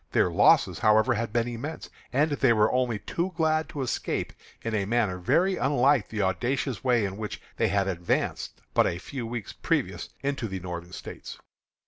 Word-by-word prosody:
Their - - +3
losses, - - +4
however, 110 +3 +4
had 115 -1 -2
been 120 +1 +1
immense, 120 +7 -6 0.2
and 150 +4 +2
they 135 -4 +3
were 105 -1 +3
only 125 -3 +1
too 175 - -3
glad 155 -1 +1
to 140 - -3
escape 125 - -2 0.3
in 115 - -2
a 100 -2 +1
manner 105 -4 0
very 180 - +2
unlike 135 -3 +3
the 105 -2 -1
audacious 120 +6 -1
way 120 -5 +3
in 95 0 -4
which 105 -1 -5 0.2
they 115 - +2
had 100 -1 +1
advanced 90 -2 -2
but - - +4
a 85 - -2
few 115 +7 -6
weeks 115 -3 -5
previous - - -1
into 140 -4 -1
the 95 -2 -4
Northern 90 -1 -6
States. - - -8
115 Hz, 180 wpm, -27 LUFS, 100-135 Hz, 0.3 s, losses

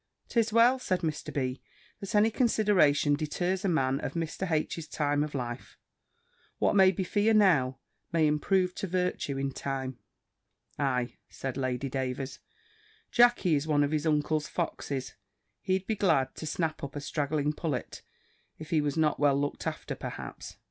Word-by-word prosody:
"'Tis 230 -2 +1
well," 235 +4 +5
said 185 -7 -1
Mr. 155 -3 -3
B.," 130 -2 -2 0.4
that 195 +1 -5
any 215 +2 +5
consideration 205 - +3
deters 175 +6 -1
a 195 - +1
man 135 -5 +1
of - - -4
Mr. 165 +3 -3
H.'s 155 0 -1
time 145 -1 0
of 150 -1 -5
life. 120 -2 -5 0.8
What - - +2
may 190 -1 +7
be 190 0 -2
fear 210 +4 +2
now, 145 -11 +4 0.3
may 165 -2 +3
improve 180 +5 +2
to 200 - -3
virtue 180 -6 -1
in 135 0 -1
time." 130 -2 -4 0.8
"Ay," 125 -4 0
said 130 -1 -5
Lady 130 0 -2
Davers, 130 0 -3 0.7
"Jackey 240 -8 +4
is 145 +1 +1
one 145 -2 +3
of 145 - 0
his 155 0 0
uncle's 150 0 +1
foxes: 135 -2 -3 0.5
he'd 190 0 0
be 220 - -1
glad 165 -10 +2
to 155 - -7
snap 160 +1 -2
up 140 +1 -6
a - - -2
straggling 145 0 -1
pullet, 150 -5 -4 0.6
if 155 +2 -10
he 160 -2 +3
was 145 +1 -2
not 155 -2 +2
well 140 -1 +3
looked 145 0 -2
after, - - -4
perhaps." - - -7
155 Hz, 160 wpm, -29 LUFS, 140-185 Hz, 0.8 s, may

